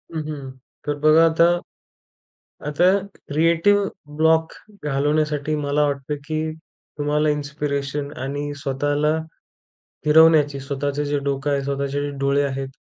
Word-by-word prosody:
हं, 160 - -1
हं. 145 -3 -6 0.3
तर 145 - -1
बघा 155 +2 +6
आता 165 +1 +4 1.2
आता 150 +4 +1 0.4
क्रिएटिव 165 +7 +3 0.3
ब्लॉक 160 +1 +3 0.3
घालवण्यासाठी 150 +1 0
मला 145 0 0
वाटतं 140 +1 -2
की 155 0 -2 0.6
तुम्हाला 150 +1 +1
इन्स्पिरेशन 145 -1 -3
आणि 145 +2 -3
स्वतःला 145 +3 0 0.9
फिरवण्याची, 150 -2 +5
स्वतःचं 140 +1 -2
जे 145 0 0
डोकं 140 +1 -1
आहे, 140 -1 +1
स्वतःचे 140 0 -2
जे 145 - -2
डोळे 140 +1 +2
आहेत, 135 -1 -3
145 Hz, 115 wpm, -22 LUFS, 140-155 Hz, 1.2 s, बघा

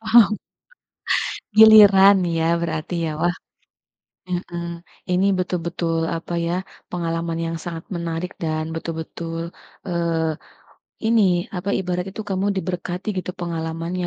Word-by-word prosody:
paham. 225 0 +6 1.3
Giliran 205 -3 +9
nih 175 -1 -1
ya 160 - +2 0.2
berarti 165 0 -3
ya. - - -1
Wah 175 0 +2 0.9
heeh. 175 -1 -4 0.5
Ini 180 +2 +2
betul-betul 170 -2 -2 0.2
apa 165 +1 -7
ya, 170 - -1 0.4
pengalaman 165 -1 -2
yang 165 0 -3
sangat 165 -1 -5
menarik 170 +1 -3
dan 155 -1 -1
betul-betul, 165 0 -5 0.5
eee, 170 -2 0 0.9
ini 225 -1 +4 0.3
apa, 185 +3 -4
ibarat 180 -1 -2
itu 220 - -6
kamu 190 +1 0
diberkati 180 0 -4
gitu 185 - -3
pengalamannya 165 +1 -3
175 Hz, 115 wpm, -22 LUFS, 165-185 Hz, 1.3 s, Giliran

